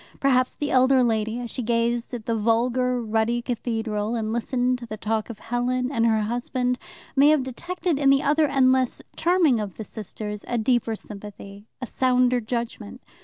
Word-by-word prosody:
Perhaps 255 -2 +2
the 290 - -3
elder 260 0 +5
lady, 220 0 0
as 240 -1 -5
she 255 - -3
gazed 235 +1 0
at 225 -3 -8
the 230 - 0
vulgar, 245 +3 +1
ruddy 225 +2 0
cathedral, 225 -2 -2
and 220 -1 -2
listened 245 +1 0
to 235 - -9
the 215 - -6
talk 220 +1 -2
of 230 - -7
Helen 250 +2 -1
and 230 -4 +2
her 220 -1 +2
husband, 245 +3 -1 0.4
may 280 +2 +6
have 305 -3 +3
detected 345 +5 -3
in 275 -2 +4
the 275 0 +4
other 300 +2 +3
and 270 -2 +4
less 260 -1 0
charming 335 -7 +3
of 205 -4 -5
the 220 - -5
sisters 210 0 -7
a 240 - -1
deeper 235 -1 +1
sympathy, 205 0 -10 0.2
a - - -1
sounder 250 0 +2
judgment. 235 - -5
240 Hz, 180 wpm, -24 LUFS, 220-255 Hz, 0.4 s, may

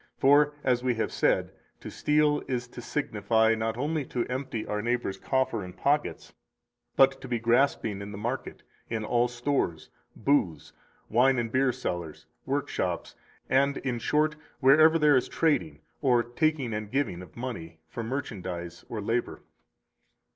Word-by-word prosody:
For, 145 +2 +5
as 125 -1 +1
we 125 -2 +1
have 115 - -1
just - - -8
said, - - +2 0.3
to - - -8
steal 150 0 +2
is 125 -1 -2
to 120 - -9
signify 110 -4 +1
not 110 0 -2
only 150 +3 -1
to 120 -2 -2
empty 130 -3 -4
our 105 0 -2
neighbor's 120 -4 -1
coffer 130 -5 0
and 90 0 -10
pockets, 145 +1 0 0.6
but 135 0 +4
to 135 - -8
be 120 -1 0
grasping 115 -3 +1
in 100 +1 -7
the 100 - -7
market, 120 +6 -4 0.3
in 110 -1 -2
all 120 +2 +2
stores, 120 - -2 0.2
booths, 105 - 0 0.3
wine 125 +4 +3
and 115 -1 -1
beer 130 +1 +3
cellars, 85 -8 -5 0.2
workshops, - - -2 0.3
and, 140 +2 +2
in 125 -3 -2
short, 150 +5 +1 0.2
wherever 155 +4 +6
there 150 -2 +5
is 130 - +1
trading 160 -1 0 0.2
or 125 -4 +3
taking 130 0 0
and 105 -1 -4
giving 130 -9 -1
of 90 +3 -13
money 105 -10 -6
for 120 - -6
merchandise 95 -9 -5
or 110 -3 -4
labor. 115 +4 -2
120 Hz, 155 wpm, -28 LUFS, 110-140 Hz, 0.6 s, wherever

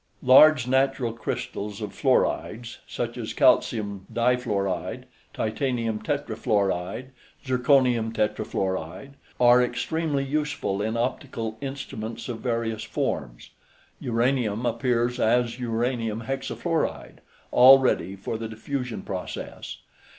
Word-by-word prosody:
Large 135 +1 +7
natural 130 -2 +1
crystals 105 -2 -5
of - - -5
fluorides, 115 +2 0
such - - -4
as - - -5
calcium 100 -4 +2
difluoride, 115 -7 0 0.3
titanium 115 -1 -2
tetrafluoride, 110 -4 -1 0.3
zirconium 125 -3 +3
tetrafluoride, 95 - -2 0.3
are 125 0 +6
extremely 140 +4 -1
useful 140 -8 -2
in 110 +2 -1
optical 115 -2 -3
instruments 125 -5 -6
of 115 -2 -4
various 115 -3 -2
forms. - - -4 0.5
Uranium 120 -2 0
appears 120 +1 0
as 120 +2 +2
uranium 115 -2 -1
hexafluoride, 135 +6 -3 0.3
all 130 +2 +9
ready 125 -7 0
for 105 +3 -5
the 115 - -4
diffusion 125 +2 -4
process. 95 -2 -6
120 Hz, 100 wpm, -25 LUFS, 110-130 Hz, 0.5 s, all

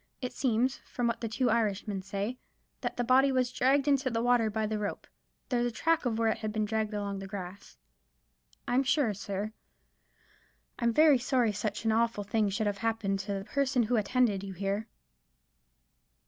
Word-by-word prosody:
It 250 -2 -4
seems, 255 +1 +1
from 245 - -4
what 235 -1 -1
the 230 - -1
two 245 +2 +1
Irishmen 210 -3 0
say, 200 +6 -4 0.4
that - - -4
the 245 - +1
body 260 +3 +4
was 255 -1 +1
dragged 270 +3 +2
into 275 -2 +3
the 230 -1 -1
water 245 -2 +3
by 215 +1 -1
the 215 0 -2
rope. 205 -1 -4 0.4
There 245 - +1
was 240 0 0
the 220 - -13
track 325 +3 +2
of 225 -2 -1
where 225 -1 +2
it - - -1
had 215 -1 -3
been 215 0 0
dragged 215 0 -1
along 200 -1 -3
the 195 - -7
grass. 190 - -8 0.9
I'm 250 +2 +3
sure, 275 -4 +2
sir, 200 +2 -4 1.3
I'm 235 -1 +2
very 300 +1 +5
sorry 245 -2 +2
such 210 +1 -3
an 225 - +3
awful 230 -1 +1
thing 210 0 +1
should 200 +3 -1
have 205 -1 -1
happened 215 -3 -1
to 200 +1 -3
the—the 195 0 -4
person 270 -2 +1
who 235 +3 0
attended 215 -2 +1
you 195 -1 -6
here." 200 +3 -2
225 Hz, 190 wpm, -30 LUFS, 205-250 Hz, 1.3 s, very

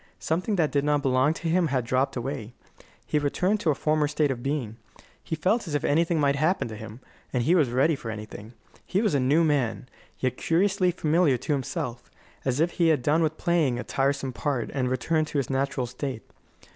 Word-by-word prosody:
Something 180 +6 -1
that 160 -5 +1
did 140 -1 +1
not 145 -1 +1
belong 135 +3 +2
to 170 - -5
him 170 +1 +2
had 130 -4 -1
dropped 130 +3 0
away; 120 -2 -4 0.5
he - - 0
had 145 - -1
returned 185 +8 +1
to 175 - 0
a 150 - +3
former 155 0 +1
state 150 -1 +1
of 120 -2 -4
being. 130 -5 -3 0.5
He - - -3
felt 190 +7 0
as 150 - -2
if 145 - -1
anything 165 +2 +2
might 140 -1 +2
happen 170 +4 +1
to 110 - -7
him, 110 +3 -9 0.3
and 125 -2 0
he 160 - +3
was 155 -8 +3
ready 135 +6 +2
for 120 -4 -7
anything. 105 +1 -8 0.3
He 190 - -1
was 215 -5 +1
a 140 - +3
new 140 +6 +3
man, 135 -6 0 0.3
yet 130 -1 -1
curiously 185 +2 +2
familiar 160 -4 +2
to 150 - -2
himself 125 -3 -4 0.4
as 130 +1 0
if 170 +2 +2
he 170 -1 +2
had 150 -6 +2
done 155 +4 +3
with 160 -1 0
playing 160 -8 +1
a 125 - -4
tiresome 135 -1 -1
part 130 -3 -2
and 130 -3 0
returned 155 +5 0
to 150 - -3
his 135 -1 -1
natural 135 -1 0
state. 125 -1 -5
145 Hz, 215 wpm, -26 LUFS, 130-160 Hz, 0.5 s, a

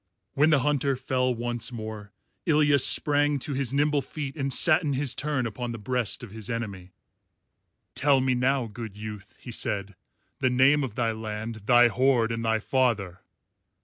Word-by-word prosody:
When 145 +3 +3
the 150 -4 +3
Hunter 140 -1 0
fell 130 0 -1
once 120 0 -3
more, 110 -3 -8 0.4
Ilya 150 -2 +3
sprang 145 +2 +4
to 140 +2 -3
his 135 -2 -1
nimble 145 +1 +1
feet 140 0 -7
and 135 -3 -3
sat 155 +5 +5
in 150 -4 -2
his 135 -1 0
turn 145 -3 -2
upon 120 +2 -5
the - - -6
breast 125 +2 -2
of 115 - -9
his 110 -1 -7
enemy. 100 -6 -5 1.0
"Tell 140 -1 +3
me 130 0 +1
now, 130 +1 +1
good 110 -2 -9
youth," 105 -1 -9
he 125 - -9
said, 100 -3 -2 0.5
"the 130 - +2
name 135 +4 +3
of 120 -5 -5
thy 120 -3 0
land, 110 -1 -6
thy 120 0 +6
horde, 125 -1 +1
and 115 0 -3
thy 110 0 +1
father." 110 -7 -1
125 Hz, 175 wpm, -26 LUFS, 110-140 Hz, 1.0 s, thy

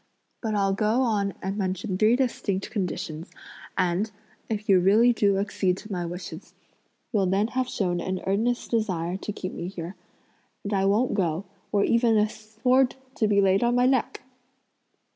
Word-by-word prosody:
But 220 -2 -1
I'll 195 -1 +2
go 215 +5 +1
on 205 -5 0
and 195 +2 -2
mention 190 +1 -2
three 215 +5 +4
distinct 225 -7 -1
conditions, 175 -5 -4 0.5
and, 185 +3 +1 0.4
if 215 -1 -3
you 195 -3 +6
really 215 +7 +5
do 200 -3 +2
accede 195 -2 0
to 215 - -10
my 175 -3 -2
wishes, 175 +2 -8 0.6
you'll 200 -3 +2
then 200 +4 +1
have 255 0 -1
shown 175 -6 -1
an 185 +1 -2
earnest 225 +5 0
desire 185 -7 0
to 210 - -5
keep 185 -2 -6
me 170 - -5
here, 180 0 -6 0.7
and 205 - -3
I 195 -1 +2
won't 215 +6 +2
go, 180 -2 0 0.3
were 205 -1 +3
even 230 -1 +3
a 210 0 +4
sword 225 +5 +1 0.2
to 220 -5 +1
be 200 -1 +4
laid 195 +2 +3
on 240 0 +2
my 245 0 +4
neck!" 260 -1 +1
200 Hz, 170 wpm, -26 LUFS, 185-225 Hz, 0.7 s, you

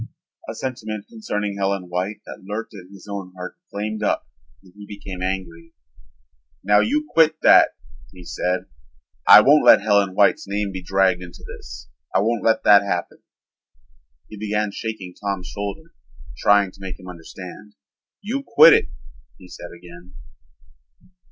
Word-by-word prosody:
A - - -5
sentiment 110 -5 -5
concerning 105 -2 -4
Helen 100 -1 -1
White 90 +4 -4
that - - -10
lurked 105 +4 -6
in 95 -3 -12
his 100 0 -14
own 100 -2 -7
heart 90 0 -8
flamed 105 +1 -4
up - - -1 0.4
and 90 - -20
he 105 0 -12
became 100 -3 -9
angry. 90 -3 -5 0.9
"Now 105 +2 +4
you 300 - 0
quit 160 - +3
that," - - +6 0.4
he 90 -1 -14
said. 90 +1 -2 0.6
"I - - +10
won't 145 +5 +5
let - - +8
Helen 100 -2 +2
White's 100 -1 +3
name 100 0 -2
be 95 -1 -6
dragged 95 -1 +1
into 85 -1 -12
this. - - -11 0.3
I - - +5
won't 115 +1 -1
let 110 - +2
that 100 -1 +7
happen." 90 -4 -4 1.1
He 105 - -11
began 105 0 -1
shaking 100 -4 -6
Tom's 100 -3 -3
shoulder, 105 +12 -7 0.4
trying 100 +2 +3
to 95 - -19
make 95 -1 -7
him 95 - -13
understand. 90 +4 -11 0.5
"You 245 +7 -3
quit 230 -10 +7
it," - - +2 0.5
he 90 - -15
said 90 - -10
again. 85 0 -14
100 Hz, 150 wpm, -21 LUFS, 90-105 Hz, 1.1 s, I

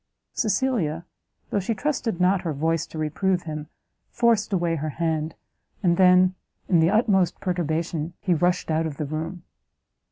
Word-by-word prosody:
Cecilia, 195 - 0 0.5
though 205 - +1
she 210 +4 -2
trusted 240 - -2
not 185 +1 +3
her 165 -3 -2
voice 160 +2 0
to - - -9
reprove 175 +4 0
him, 155 -2 -6 0.4
forced 230 -3 +2
away 170 -3 +1
her 155 +1 -3
hand, 160 0 -2 0.5
and 175 -2 +4
then, 185 0 +5 0.3
in 175 - +4
the 160 +1 +4
utmost 195 -5 +2
perturbation, 170 -2 -2
he 185 -4 +1
rushed 175 +1 +1
out 160 +1 +1
of 145 -3 -7
the 150 - -2
room. 160 +4 -5
175 Hz, 155 wpm, -24 LUFS, 160-190 Hz, 0.5 s, then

